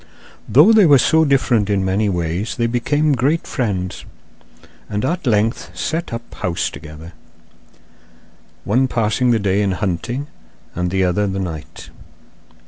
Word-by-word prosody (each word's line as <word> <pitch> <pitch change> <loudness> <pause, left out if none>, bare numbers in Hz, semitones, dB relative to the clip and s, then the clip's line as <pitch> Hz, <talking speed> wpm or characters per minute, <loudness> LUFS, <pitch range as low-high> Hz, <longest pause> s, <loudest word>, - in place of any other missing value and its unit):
Though 160 - +6
they 210 -5 +6
were 145 -2 +7
so 160 +5 +3
different 125 -7 +2
in 100 -2 +1
many 100 +3 +1
ways 90 +3 -2
they 115 - 0
became 145 +6 +1
great 140 +6 0
friends, 95 -6 -3 0.9
and 105 +3 -2
at 170 +1 -2
length 105 -6 0
set 165 - -3
up 115 0 -7
house 85 -2 -2
together, 80 +3 -11 1.5
one 125 +6 +2
passing 120 +1 0
the 120 - +3
day 100 -1 0
in 100 -2 0
hunting 105 +8 -3 0.5
and 90 0 -2
the 95 +1 0
other 95 +3 +1
the 95 0 -3
night. 80 -5 -7
105 Hz, 140 wpm, -19 LUFS, 95-130 Hz, 1.5 s, were